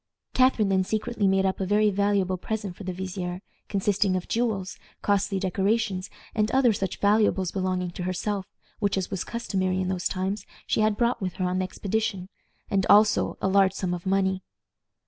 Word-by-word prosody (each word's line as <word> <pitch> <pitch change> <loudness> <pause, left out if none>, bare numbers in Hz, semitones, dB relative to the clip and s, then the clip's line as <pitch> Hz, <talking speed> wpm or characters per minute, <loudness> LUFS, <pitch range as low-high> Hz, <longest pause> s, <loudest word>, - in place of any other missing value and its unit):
Catharine 255 -5 +3
then 190 -1 +3
secretly 215 +1 -1
made 190 0 +3
up 190 - 0
a 190 - 0
very 210 +1 +3
valuable 200 -1 +1
present 205 -1 -4
for 205 - -9
the 185 - -3
vizier, 185 0 -5 0.3
consisting 200 -1 +1
of 185 - -3
jewels, 215 -6 -1 0.2
costly 200 -1 +1
decorations, 195 +1 0 0.2
and 215 0 +1
other 260 -3 +4
such 195 -2 -3
valuables 205 -3 +3
belonging 185 -2 -1
to 175 - -7
herself, 190 +1 -2 0.3
which, 200 -2 +1
as 185 -2 -2
was 190 - -2
customary 190 -5 -1
in 185 0 -1
those 185 -1 0
times, 190 +3 -2 0.2
she - - 0
had 215 -1 +2
brought 240 -1 +1
with 185 -2 -2
her 185 - -1
on 180 +1 0
the 185 - 0
expedition, 195 -1 -2 0.4
and 195 -1 +1
also 210 +1 +4
a - - +3
large 190 0 +4
sum 180 -2 -2
of 175 +1 -5
money. 190 -1 +1
195 Hz, 185 wpm, -26 LUFS, 185-210 Hz, 0.4 s, other